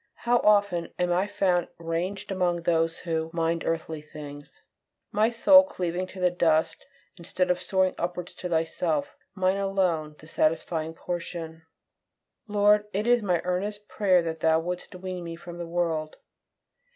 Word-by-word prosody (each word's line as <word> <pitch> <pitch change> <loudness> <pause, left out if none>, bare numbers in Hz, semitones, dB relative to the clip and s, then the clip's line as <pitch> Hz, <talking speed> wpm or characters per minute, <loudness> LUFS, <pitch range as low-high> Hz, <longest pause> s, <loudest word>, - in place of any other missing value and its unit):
How 240 +1 +4
often 200 -5 +3
am 180 0 +1
I 185 +3 +1
found 180 -3 +1
ranged 170 +5 -3
among 175 -2 0
those 165 -1 +1
who 160 -1 -2
"mind 165 0 0
earthly 160 -1 -2
things;" 145 -1 -10 0.6
my 215 +2 +3
soul 280 +4 +7
cleaving 180 -7 -3
to 185 - -11
the 180 -1 +3
dust, 160 -3 +1 0.3
instead 180 +1 -1
of 180 0 -1
soaring 190 0 +1
upwards 175 0 -4
to 180 - -6
Thyself, 160 -2 -1 0.2
my 185 -1 +2
alone 190 -6 0
satisfying 160 +1 -1
portion! 165 -2 -6 0.8
Lord, 210 0 +3
it 205 +3 -1
is 240 0 +4
my 180 -5 +1
earnest 205 +3 -3
prayer 185 -4 +3
that 160 -1 -4
Thou 160 0 +3
wouldst 180 +2 -5
wean 180 -1 -5
me 165 -1 -6
from 175 0 -10
the 170 - -5
world. 165 -3 -1
175 Hz, 150 wpm, -27 LUFS, 165-190 Hz, 0.8 s, soul